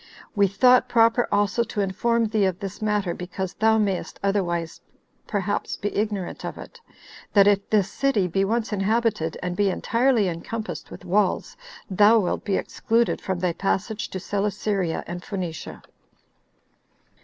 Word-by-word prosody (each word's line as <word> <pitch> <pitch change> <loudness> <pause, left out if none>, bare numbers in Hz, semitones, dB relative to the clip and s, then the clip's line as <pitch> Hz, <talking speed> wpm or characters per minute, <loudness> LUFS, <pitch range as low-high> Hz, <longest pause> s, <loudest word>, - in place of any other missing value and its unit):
We 200 -1 +4
thought 250 +6 +4
proper 230 +1 +4
also 205 +3 +2
to 220 - -5
inform 230 +4 +1
thee 215 -2 +2
of 185 -2 0
this 200 0 -7
matter, 210 -4 0
because 180 +1 -5
thou 220 0 +3
mayst 200 -4 -1
otherwise 175 -5 -1 0.5
perhaps 205 -1 -2
be 205 - -4
ignorant 205 -3 -2
of - - -5
it, 475 - -11 0.5
that 200 -2 +6
if 200 -1 +2
this 205 -3 +3
city 215 -3 +1
be 195 +3 0
once 225 +2 -1
inhabited 205 -5 0
and 180 -1 -2
be 200 +1 +2
entirely 230 +2 +2
encompassed 215 +6 -5
with - - -11
walls, 190 +1 0 0.3
thou 205 +3 +5
wilt 195 -5 0
be 200 - 0
excluded 230 +1 0
from 190 -2 -2
thy 180 -2 +1
passage 205 +4 -2
to 190 - -5
Celesyria 200 -2 -1
and 175 +1 -6
Phoenicia." 180 -5 -6
200 Hz, 150 wpm, -24 LUFS, 185-220 Hz, 0.5 s, that